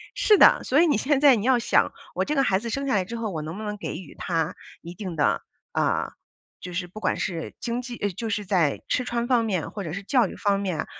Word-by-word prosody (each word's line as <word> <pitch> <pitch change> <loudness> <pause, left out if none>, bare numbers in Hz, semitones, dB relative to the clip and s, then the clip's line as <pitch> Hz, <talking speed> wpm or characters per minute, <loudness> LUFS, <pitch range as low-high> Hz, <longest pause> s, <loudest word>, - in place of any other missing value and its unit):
是 420 - +5
的。 - - +7
所 280 +5 +4
以 345 - +5
你 295 - +3
现 275 +4 +1
在 280 -3 +7
你 210 - -3
要 260 -1 +4
想， 235 - +2 0.2
我 - - 0
这 300 - -1
个 275 - +3
孩 190 -6 +2
子 235 +3 -5
生 275 +4 -2
下 265 - +2
来 190 -2 +1
之 230 - -6
后， 225 -2 -3
我 160 -4 -4
能 160 +4 -6
不 215 - -6
能 210 -1 -4
给 205 - -5
予 180 -6 -9
他 165 -1 -1 0.3
一 170 +1 -9
定 180 -2 -6
的， 145 - +1 0.3
啊， - - 0 0.5
就 180 - -8
是 175 +1 -3
不 185 +5 -10
管 185 - 0
是 165 -3 -4
经 240 +1 -2
济 245 -1 -7
呃， 205 - -1
就 220 +5 -5
是 210 -1 -1
在 175 -7 +1
吃 250 - 0
穿 235 -1 -1
方 240 -3 +3
面 190 -6 -2
或 205 - -5
者 155 - -5
是 195 +2 -5
教 240 +1 +3
育 - - -9
方 200 -1 +1
面， 185 -5 -2
210 Hz, 290 characters per minute, -25 LUFS, 180-245 Hz, 0.5 s, 的